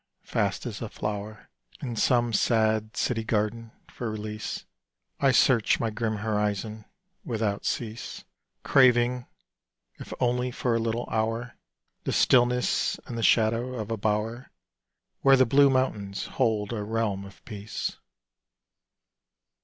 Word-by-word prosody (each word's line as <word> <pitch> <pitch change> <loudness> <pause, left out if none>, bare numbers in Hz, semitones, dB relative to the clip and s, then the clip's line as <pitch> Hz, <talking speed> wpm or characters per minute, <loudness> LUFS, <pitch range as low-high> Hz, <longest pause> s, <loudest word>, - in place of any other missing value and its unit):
Fast 100 -1 -1
as 110 -4 -5
a 115 - -4
flow'r 105 +1 -5 0.3
In 125 -4 -4
some 120 +1 +2
sad 110 -1 +1
city 115 -3 0
garden, 110 +1 -1 0.2
for 120 - -5
release 110 0 -5 0.5
I 140 - +4
search 130 +3 +4
my 115 -4 -1
grim 110 0 -2
horizon 105 0 -2 0.4
without 110 -4 -2
cease, 115 0 -4 0.4
Craving, 125 -2 +4 0.7
if - - -9
only 125 0 +1
for 125 -1 -1
a 115 - +2
little 115 +1 -2
hour, 115 +2 -1 0.5
The - - -1
stillness 125 0 +3
and 120 - -6
the 115 - -3
shadow 115 +3 +2
of 110 -2 -5
a - - +1
bow'r 110 +4 -1 0.7
Where 135 0 +6
the 130 - +5
blue 140 +4 +5
mountains 105 -7 -1
hold 110 -4 0
a 110 - -3
realm 105 -2 -1
of 100 0 -14
peace. 105 -1 -5
115 Hz, 130 wpm, -27 LUFS, 105-120 Hz, 0.7 s, Where